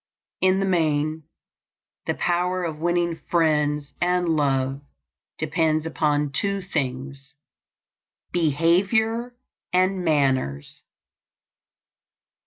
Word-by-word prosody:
In 185 +1 +4
the 195 - +1
main, 155 -3 0 0.8
this - - -1
power 180 +1 0
of 160 -3 -4
winning 170 0 0
friends 150 -3 +1
and 180 0 +1
love 135 -3 +1 0.6
depends 155 0 0
upon 150 -2 0
two 200 +8 0
things: 140 -4 -4 1.0
behavior 195 - +1 0.4
and 185 +1 +2
manners. 135 - 0
160 Hz, 80 wpm, -24 LUFS, 145-180 Hz, 1.0 s, In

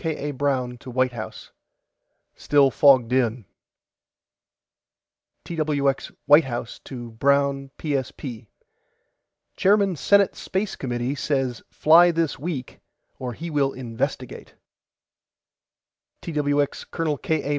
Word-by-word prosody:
K. 155 -3 -3
A. - - -2
BROWN 130 -3 -1
TO 130 - -10
WHITE 130 +1 +1
HOUSE: 115 -3 -8 0.8
STILL 140 -2 +3
FOGGED 130 -4 +5
IN 120 -3 +1 2.0
TWX 145 -4 -1
WHITE 150 +3 +7
HOUSE 120 -2 -5
TO 120 -3 -9
BROWN 140 +3 +1
PSP: 130 -5 -4 1.1
CHAIRMAN 200 -1 +3
SENATE 200 +5 +3
SPACE 190 +1 -3
COMMITTEE 120 0 -2
SAYS 135 -5 -2
FLY 170 +3 +6
THIS 165 -5 -1
WEEK 145 -4 -5 0.4
OR 125 -2 -4
HE 165 +6 -7
WILL 140 -2 +1
INVESTIGATE 120 -3 -5 1.7
TWX 145 -3 -1
COL. 160 -3 -1
K. 160 -2 -1
A. - - -4
140 Hz, 105 wpm, -24 LUFS, 125-155 Hz, 2.0 s, WHITE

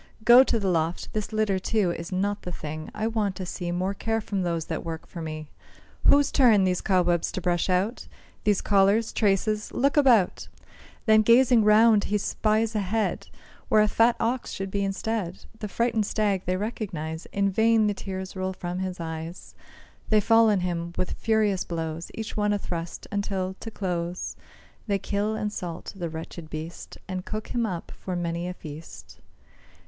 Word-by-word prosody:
Go 240 +3 +9
to 230 - 0
the 200 - -1
loft; 165 -1 -1
this 215 0 -3
litter, 215 -3 +1
too, 195 -2 +1
Is 170 +1 -6
not 200 +2 -1
the 180 - -6
thing. 155 -1 -6
I 215 +1 -3
want 215 -4 0
to 185 - -5
see 175 -1 -4
More 185 +3 -1
care 225 +2 -1
from 200 -2 -3
those 170 -2 -1
that - - -4
work 165 -1 -5
for 170 - -8
me; 155 -1 -5 0.6
Whose 285 0 +5
turn 230 -8 +5
these 185 -1 +1
cobwebs 175 -3 +2
to - - -2
brush 175 0 0
out? 190 +6 0 0.4
These 210 -3 +2
collars, 205 +2 +3
traces? 210 +1 +1
look 280 +3 +1
about!" 245 -10 +4 0.6
Then 220 -1 +6
gazing 235 +1 +5
round, 215 0 +5
he 210 - +1
spies 215 +2 0
a 215 - 0
head, 210 +3 -1 0.4
Where 215 - +5
a - - +3
fat 230 +3 +3
ox 240 +2 -1
should 195 0 -4
be 200 0 0
instead; 195 -2 -3
The 210 - -4
frightened 225 0 0
stag 205 -4 0
they 185 0 +1
recognise. 180 -7 -4
In 200 -1 +1
vain 220 +2 +4
the 205 - +2
tears 190 -1 -6
roll 185 0 -2
from 180 0 -5
his 185 -1 -4
eyes; 165 +1 -6 0.6
They 215 - +5
fall 225 +2 +5
on 200 -3 +2
him 170 -1 -3
with 185 - -1
furious 215 -4 +1
blows, 165 -1 -4
Each 220 -1 -5
one 210 -1 +1
a - - +1
thrust, 170 -3 -5
until, 195 -2 -2
to 225 - -6
close, 180 -4 -3 0.5
They 200 -1 +2
kill 205 +3 -1
and 210 -1 -2
salt 170 -4 -6
the 175 -3 -4
wretched 160 0 -8
beast, 155 +2 -7
And 185 -1 -4
cook 215 +2 -5
him 235 -2 0
up 175 -4 -5
for 185 - -4
many 170 0 -2
a 180 - -5
feast. 155 -1 -10
195 Hz, 185 wpm, -26 LUFS, 175-215 Hz, 0.6 s, Go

